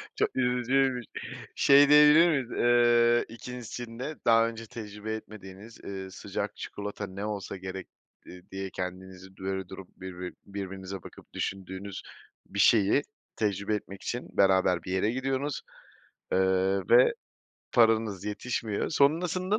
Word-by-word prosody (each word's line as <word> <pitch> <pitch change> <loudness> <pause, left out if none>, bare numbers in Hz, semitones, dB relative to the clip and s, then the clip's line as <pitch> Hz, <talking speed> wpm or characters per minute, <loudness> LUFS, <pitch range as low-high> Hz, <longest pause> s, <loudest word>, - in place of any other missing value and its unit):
Çok - - +1
üzücüymüş. 125 0 +1 0.5
Şey, 140 +1 +6
diyebilir 150 +3 +8
miyiz, 135 -6 0
eee, 120 0 +4
2.'sinde 125 +3 -6
daha 115 0 +5
önce 115 0 -7
tecrübe 105 -1 -7
etmediğiniz, 105 0 -11
eee, 95 -1 -6
sıcak 95 - -5
çikolata 105 0 -6
ne 95 +2 -6
olsa 100 -3 -4
gerek 95 0 -7 0.6
diye 95 0 -4
kendinizi 95 +1 -7
böyle 95 -1 -4
durup 95 -1 -10
birbi 90 -1 -7
birbirinize 95 -1 -6
bakıp - - -14
düşündüğünüz, 95 0 -5 0.4
bir 100 - -6
şeyi 105 +5 +5 0.3
tecrübe 100 0 0
etmek 100 -2 -8
için 120 +1 -4
beraber 95 -2 +3
bir 90 - -6
yere 95 +3 +1
gidiyorsunuz, 135 +3 -2 0.7
eee, - - +3 0.5
ve 120 +2 +6 0.6
paranız 110 -4 +3
yetişmiyor. 105 0 -2
Sonrasında 180 +7 +2
105 Hz, 120 wpm, -28 LUFS, 95-125 Hz, 0.7 s, diyebilir